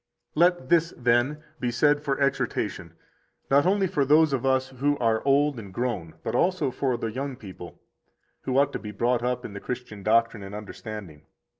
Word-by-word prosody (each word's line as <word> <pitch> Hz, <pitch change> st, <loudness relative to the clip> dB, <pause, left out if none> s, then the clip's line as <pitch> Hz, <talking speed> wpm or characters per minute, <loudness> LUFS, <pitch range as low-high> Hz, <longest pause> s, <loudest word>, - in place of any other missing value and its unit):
85 -, -, -3 dB
Let 175 Hz, -7 st, +3 dB
this, 170 Hz, -1 st, +3 dB
then, 125 Hz, +5 st, +1 dB, 0.2 s
be 125 Hz, -, -1 dB
said 145 Hz, +4 st, +3 dB
for 140 Hz, -2 st, -1 dB
exhortation, 105 Hz, -, -1 dB, 0.6 s
not 140 Hz, +5 st, +5 dB
only 195 Hz, +1 st, +3 dB
for 150 Hz, -6 st, +1 dB
those 150 Hz, +2 st, +4 dB
of 135 Hz, 0 st, 0 dB
us 130 Hz, 0 st, +2 dB
who 140 Hz, +3 st, 0 dB
are 115 Hz, -3 st, +1 dB
old 140 Hz, -1 st, +3 dB
and 100 Hz, -4 st, -9 dB
grown, 100 Hz, -7 st, -3 dB
but -, -, -3 dB
also 175 Hz, -7 st, +1 dB
for 130 Hz, -1 st, -1 dB
the 115 Hz, -1 st, -3 dB
young 135 Hz, +3 st, -4 dB
people, 95 Hz, -7 st, -11 dB, 0.6 s
who 130 Hz, 0 st, -1 dB
ought 140 Hz, 0 st, +3 dB
to -, -, -3 dB
be 105 Hz, -, -7 dB
brought 120 Hz, +4 st, +1 dB
up 125 Hz, 0 st, -2 dB
in 100 Hz, -, -7 dB
the 100 Hz, -, -6 dB
Christian 125 Hz, -3 st, -6 dB
doctrine 115 Hz, +1 st, +2 dB
and 95 Hz, +1 st, -8 dB
understanding. 105 Hz, -6 st, -8 dB
125 Hz, 190 wpm, -26 LUFS, 110-145 Hz, 0.6 s, not